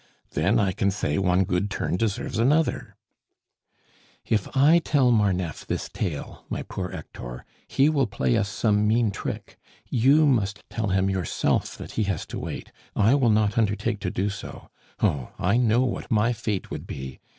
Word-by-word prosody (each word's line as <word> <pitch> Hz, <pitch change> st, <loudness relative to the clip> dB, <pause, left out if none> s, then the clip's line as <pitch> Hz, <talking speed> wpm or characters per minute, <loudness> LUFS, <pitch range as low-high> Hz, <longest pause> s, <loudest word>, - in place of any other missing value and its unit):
Then 95 Hz, +10 st, +2 dB
I 100 Hz, -4 st, +2 dB
can 100 Hz, +2 st, 0 dB
say 95 Hz, -6 st, -1 dB
one 90 Hz, 0 st, +3 dB
good 90 Hz, +3 st, -1 dB
turn 100 Hz, -, -2 dB
deserves 115 Hz, +5 st, -1 dB
another 150 Hz, +7 st, +1 dB, 0.6 s
" -, -, -35 dB
"If 105 Hz, -4 st, 0 dB
I 155 Hz, +5 st, +6 dB
tell 140 Hz, -6 st, +2 dB
Marneffe 95 Hz, -, 0 dB
this -, -, -3 dB
tale, 85 Hz, -8 st, -5 dB
my -, -, -3 dB
poor 90 Hz, -1 st, -5 dB
Hector, 60 Hz, -5 st, -8 dB, 0.2 s
he 135 Hz, -, +3 dB
will 140 Hz, -5 st, +2 dB
play 65 Hz, -, 0 dB
us 100 Hz, -, +1 dB
some 105 Hz, +1 st, +1 dB
mean 110 Hz, 0 st, +2 dB
trick. -, -, -6 dB, 0.3 s
You 135 Hz, +6 st, +5 dB
must 105 Hz, -7 st, 0 dB
tell 110 Hz, -2 st, -2 dB
him 95 Hz, 0 st, +2 dB
yourself 95 Hz, -5 st, -1 dB
that -, -, -8 dB
he 110 Hz, -, 0 dB
has 95 Hz, -5 st, -2 dB
to -, -, -3 dB
wait. -, -, -6 dB, 0.2 s
I 110 Hz, +4 st, +4 dB
will 135 Hz, -4 st, +3 dB
not 105 Hz, 0 st, +2 dB
undertake 105 Hz, 0 st, 0 dB
to 95 Hz, -, -2 dB
do 100 Hz, +3 st, -1 dB
so. 100 Hz, -, -9 dB, 0.3 s
Oh! 65 Hz, -4 st, 0 dB
I 100 Hz, +6 st, +2 dB
know 120 Hz, -1 st, +3 dB
what 130 Hz, -2 st, -2 dB
my 115 Hz, +2 st, +2 dB
fate 110 Hz, -4 st, -3 dB
would -, -, -6 dB
be. 65 Hz, -1 st, -7 dB
105 Hz, 175 wpm, -25 LUFS, 95-120 Hz, 0.6 s, I